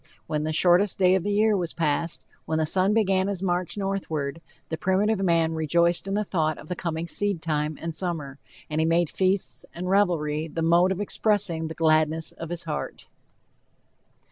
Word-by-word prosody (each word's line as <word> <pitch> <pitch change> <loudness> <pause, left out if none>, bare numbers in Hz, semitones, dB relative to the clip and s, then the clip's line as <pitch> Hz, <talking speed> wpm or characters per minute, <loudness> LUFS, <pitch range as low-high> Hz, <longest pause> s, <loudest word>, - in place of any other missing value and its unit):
When 150 -1 -2
the 155 - -1
shortest 180 +5 +3
day 185 -1 +4
of 190 - +2
the 205 +4 -2
year 215 +1 +3
was 175 -4 -3
passed, 165 0 -1 0.2
when 160 - -1
the 160 - +1
sun 185 +5 +2
began 195 -3 +2
his 195 -2 -2
march 180 0 -1
northward, 165 -7 -3 0.3
the 160 - -1
primitive 195 +4 +1
man 165 -3 +2
rejoiced 170 +3 +1
in 195 - -1
the 210 - +1
thought 155 -6 -1
of 155 - -12
the 180 - -2
coming 165 -1 -3
seedtime 160 -7 -1
and 165 0 -4
summer, 155 -5 -4 0.3
and 155 +1 -1
he - - +2
made 165 0 +2
feasts 185 -10 0
and 180 +2 -3
revelry 160 -6 +1
the 165 +1 -3
mode 170 +3 +4
of 190 +1 -2
expressing 200 -6 0
the 160 - -7
gladness 155 0 +2
of 165 - -8
his 175 0 -3
heart. 155 -2 -5
170 Hz, 185 wpm, -25 LUFS, 160-190 Hz, 0.3 s, day